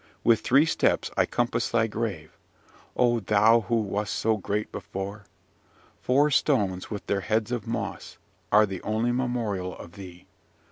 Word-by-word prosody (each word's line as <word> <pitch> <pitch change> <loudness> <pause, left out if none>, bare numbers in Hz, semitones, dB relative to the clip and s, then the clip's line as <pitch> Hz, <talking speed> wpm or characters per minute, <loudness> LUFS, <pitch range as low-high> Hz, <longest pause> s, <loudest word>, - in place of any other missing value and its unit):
With 115 -2 +4
three 135 +7 +4
steps - - +1
I - - +2
compass - - -1
thy 115 -1 +2
grave, 105 -8 -4 0.6
O 120 -1 +3
thou 105 +3 +4
who 120 - +1
wast 105 0 -2
so 110 0 +1
great 105 +1 -3
before! 100 +2 -6 0.8
Four 145 +4 +3
stones, 100 -11 +1
with 105 -2 -6
their 100 -1 -1
heads 110 +4 -1
of 120 -4 -3
moss, 115 -2 -5 0.3
are 105 +1 +6
the 95 -3 -6
only 110 +3 0
memorial 115 -7 -2
of 85 - -11
thee. 90 -1 -12
110 Hz, 150 wpm, -26 LUFS, 100-120 Hz, 0.8 s, are